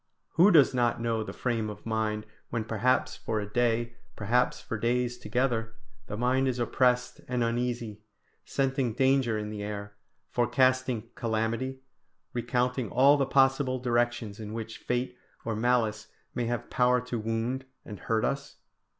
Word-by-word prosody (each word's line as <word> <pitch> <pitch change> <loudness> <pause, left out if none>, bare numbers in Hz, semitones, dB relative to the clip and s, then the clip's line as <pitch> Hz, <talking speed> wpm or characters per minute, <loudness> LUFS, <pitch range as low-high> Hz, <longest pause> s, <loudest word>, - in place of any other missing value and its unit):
Who 180 +5 +5
does 150 -9 +6
not 120 -2 +1
know 115 -1 0
the 110 - -5
frame 115 -3 -1
of 105 - -9
mind 110 -1 -1 0.2
when 115 -2 -2
perhaps 115 +3 +1
for 110 -1 -2
a 105 - -3
day, 120 +2 0 0.2
perhaps 125 +4 +1
for - - -5
days 120 +1 +1
together, 115 -1 -1 0.3
the 105 - -5
mind 130 +3 +2
is 125 -1 0
oppressed 125 +1 +1
and 125 -1 0
uneasy, 115 -2 -2 0.4
scenting 135 -3 0
danger 130 -3 +3
in 105 0 -4
the 105 -1 -5
air, 100 0 -5 0.4
forecasting 125 -1 +1
calamity, 115 +3 -2 0.5
recounting 125 0 0
all 135 +8 +6
the 140 -2 +1
possible 135 -1 +3
directions 120 -4 0
in 105 -1 -6
which 115 0 -6
fate 125 0 -2 0.3
or 115 -1 -1
malice 110 -2 +1 0.3
may 120 - -1
have 120 0 -3
power 125 0 +3
to 125 -1 -4
wound 115 +4 -2 0.2
and 105 -3 -8
hurt 110 +4 0
us? 140 0 -3
120 Hz, 150 wpm, -29 LUFS, 110-125 Hz, 0.5 s, does